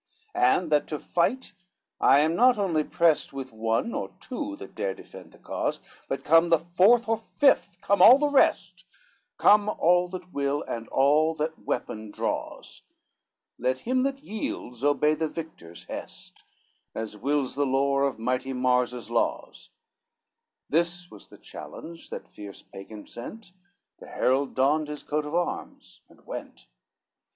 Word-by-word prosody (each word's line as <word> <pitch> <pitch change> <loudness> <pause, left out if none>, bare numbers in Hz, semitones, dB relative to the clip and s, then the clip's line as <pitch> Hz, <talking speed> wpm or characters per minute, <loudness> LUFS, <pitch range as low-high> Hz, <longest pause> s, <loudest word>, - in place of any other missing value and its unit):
XVI 370 +1 +4
"And 175 -3 -5
that 150 -1 +2
to 150 - -3
fight 205 - -1 0.5
I 140 - +5
am 160 +2 +1
not 250 +4 +5
only 175 -7 +1
prest 160 -1 +1
With 135 -3 -7
one 115 - -1
or - - -3
two 295 +4 -5
that - - -11
dare - - -3
defend - - -13
the - - -18
cause, - - -3 0.3
But - - -3
come 165 +1 +5
the 165 - +5
fourth 185 +9 +3
or 225 0 +1
fifth, 225 -4 +1
come 200 0 +2
all 250 - +10
the 295 +1 +1
rest, 280 - +2 0.5
Come 210 0 +5
all 180 -2 +3
that 180 0 -9
will, 140 +1 -1
and 115 -1 -6
all 150 +4 +3
that 160 +1 -3
weapon 110 0 -4
draws, - - -5 0.8
Let 130 +1 -1
him 255 +2 0
that 275 +1 -2
yields 135 - -5
obey 145 +1 +3
the 160 +1 -1
victor's 90 - -9
hest, - - -9 0.5
As 110 -1 -5
wills 135 +4 -1
the 145 0 0
lore 140 +1 +1
of 140 -1 0
mighty 125 +3 -2
Mars 125 -1 +1
his 120 -2 -8
laws:" 115 - -2 1.0
This 170 +3 -1
was - - -13
the - - -16
challenge 165 0 -10
that - - -7
fierce 100 -2 -11
Pagan 105 +2 -11
sent, 180 - -10 0.5
The - - -12
herald 135 +2 0
donned 145 +4 +2
his 150 0 -7
coat 150 0 -2
of 150 - -4
arms, 175 0 -4
and - - -22
went. - - -8
155 Hz, 160 wpm, -26 LUFS, 130-180 Hz, 1.0 s, all